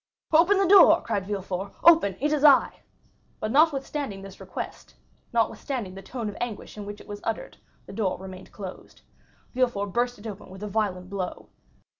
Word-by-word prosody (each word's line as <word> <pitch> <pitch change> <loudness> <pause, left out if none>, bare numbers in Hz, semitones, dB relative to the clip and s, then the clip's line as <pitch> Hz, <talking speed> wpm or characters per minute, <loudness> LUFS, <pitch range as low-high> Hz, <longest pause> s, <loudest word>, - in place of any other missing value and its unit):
"Open 350 +6 +6
the 390 -1 +3
door!" 355 -3 +8
cried 200 -4 -2
Villefort. 195 -1 -4
"Open; 320 - +6
it 295 +2 +1
is 300 -1 0
I." 285 -3 +5 0.6
But 215 - -2
notwithstanding 275 -7 +1
this 195 -1 -11
request, - - -7 0.4
notwithstanding 230 -2 -1
the 195 - -9
tone 230 +3 -5
of 205 - -5
anguish 235 -4 -5
in 205 -1 -7
which 205 0 -7
it - - -14
was 205 0 -7
uttered, 225 -1 -4 0.3
the - - -10
door 200 -5 -1
remained 185 0 -10
closed. 190 -3 -10 0.5
Villefort 240 -6 0
burst 245 +1 0
it 205 - -14
open 210 -3 -8
with 190 +2 -10
a - - -3
violent 195 -3 -1
blow. 190 -3 -5
210 Hz, 175 wpm, -26 LUFS, 195-270 Hz, 0.6 s, door